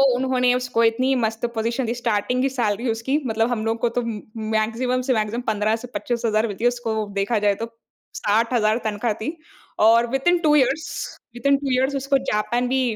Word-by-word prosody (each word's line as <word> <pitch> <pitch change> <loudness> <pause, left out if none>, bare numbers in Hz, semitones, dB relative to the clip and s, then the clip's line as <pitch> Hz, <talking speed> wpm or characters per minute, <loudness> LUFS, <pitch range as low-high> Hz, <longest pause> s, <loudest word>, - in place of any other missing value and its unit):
उन्होंने 250 -1 +2
उसको 250 -2 0
इतनी 255 +4 +2
मस्त 225 -1 -1
पोज़ीशन 230 +3 -1
दी। 230 - -1
स्टार्टिंग 240 +1 0
की 270 - +2
सैलरी 235 -2 -1
उसकी 230 +6 0
मतलब 225 +1 +1
हम 235 -3 -1
लोग 225 +1 -1
को 240 - +2
तो 245 - +3
उम 230 - -3 0.3
उम, 220 - -5
मैक्सिमम 230 +4 0
से - - +5
मैक्सिमम 220 +1 -1
15 215 0 +1
से 250 - -6
25 230 +3 -2
हज़ार 215 0 +2
मिलती 205 +1 -6
है। 240 - +5
उसको 240 -2 -1 0.2
देखा 210 +3 +1
जाए, 205 -1 +2
तो 230 - -4 0.5
60 225 +4 +1
हज़ार 215 -1 +3
तनख़्वाह 215 +1 0
थी। 310 +9 -4 0.5
और 230 +2 +5
within 270 +8 +2
two 305 -3 +3
years 300 +3 +2 0.5
within 280 +3 +2
two 275 -1 -3
years, 265 +2 +1
उसको 275 0 +1
जापान 240 +4 0
भी 265 0 +2
235 Hz, 205 wpm, -22 LUFS, 220-255 Hz, 0.5 s, से